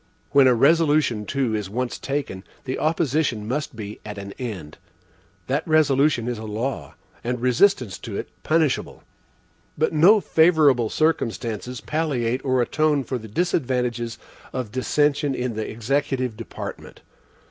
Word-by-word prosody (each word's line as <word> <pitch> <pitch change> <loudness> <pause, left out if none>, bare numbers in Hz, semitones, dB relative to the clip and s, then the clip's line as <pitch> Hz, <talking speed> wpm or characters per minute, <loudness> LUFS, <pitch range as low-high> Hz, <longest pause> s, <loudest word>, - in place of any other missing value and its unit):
When 140 -2 +6
a 125 - +5
resolution 145 -5 +3
too 135 -5 0
is 105 -3 -2
once 125 +4 -3
taken, 135 -9 -3 0.2
the 130 0 -3
opposition 150 -8 0
must 140 +1 -3
be 105 -1 -7
at 105 -1 -7
an 100 0 -7
end. 95 - -6 0.7
That 140 +6 -1
resolution 145 -5 +3
is 120 -3 -3
a - - -7
law, 110 +5 -4 0.3
and 125 +1 -2
resistance 125 - +2
to - - -6
it - - -4
punishable. 155 -4 0 0.7
But 155 +2 +1
no 180 +8 +6
favorable 155 - +4
circumstances 125 -6 -1
palliate 130 -6 -1
or 130 -2 +2
atone 150 +1 +1
for 130 +1 -3
the 110 - -10
disadvantages 125 - -1 0.4
of 125 -5 -4
dissension 145 +3 +1
in 125 -1 -2
the 110 0 -4
executive 130 +1 -1
department. 115 0 -8
130 Hz, 135 wpm, -23 LUFS, 115-150 Hz, 0.7 s, When